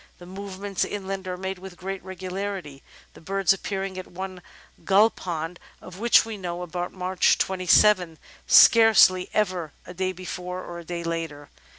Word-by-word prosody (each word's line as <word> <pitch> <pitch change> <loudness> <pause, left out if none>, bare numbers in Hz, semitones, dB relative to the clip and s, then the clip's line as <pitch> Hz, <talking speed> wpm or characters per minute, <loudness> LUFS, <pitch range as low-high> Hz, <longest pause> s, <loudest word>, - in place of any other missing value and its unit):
The 175 - -13
movements 195 +1 -4
in 200 -2 -5
land 195 -1 -5
are 180 0 -4
made 190 0 -5
with 185 -1 -11
great 190 +1 -6
regularity, 185 -5 -6 0.3
the - - -15
birds 195 0 +2
appearing 195 -1 -4
at 185 - -8
one 185 0 -7 0.4
gull 205 +3 +5
pond» 165 -1 -5 0.2
of 185 +1 -12
which 235 0 +5
we 225 -2 -6
know, 175 -2 -5
about 175 +1 -4
March 185 0 +1
27, 185 -2 +3 0.3
scarcely 220 -5 +6
ever 180 -7 -1
a - - -9
day 185 +1 -1
before 180 0 -6
or 170 0 -8
a - - -10
day 170 0 -5
later. 165 -4 -5
185 Hz, 165 wpm, -25 LUFS, 175-195 Hz, 0.4 s, scarcely